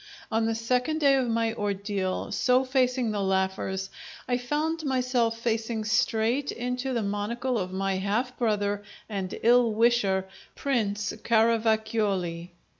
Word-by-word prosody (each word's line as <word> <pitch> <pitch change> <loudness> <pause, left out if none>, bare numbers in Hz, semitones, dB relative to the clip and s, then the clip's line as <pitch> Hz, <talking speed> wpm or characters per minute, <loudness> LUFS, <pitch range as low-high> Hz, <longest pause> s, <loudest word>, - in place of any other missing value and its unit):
On 225 0 +1
the 225 - 0
second 250 +7 0
day 280 -3 +5
of 260 -3 +1
my 230 0 +1
ordeal, 200 -3 -2
so 255 +1 +3
facing 255 -3 +1
the 205 -1 -1
laughers, 190 0 -1 0.4
I 245 0 +1
found 310 +6 -1
myself 250 -4 +1
facing 225 -1 -1
straight 225 +5 +1
into 250 +2 -3
the 235 -3 0
monocle 220 +5 -1
of 185 -1 -3
my 195 0 -1
half 220 +7 -1
brother 205 -3 0 0.3
and 195 -3 -4
ill 235 -1 +5
wisher, 210 -5 +2 0.3
Prince 210 -7 -1
Caravacioli. 220 -6 +1
225 Hz, 130 wpm, -27 LUFS, 200-250 Hz, 0.4 s, day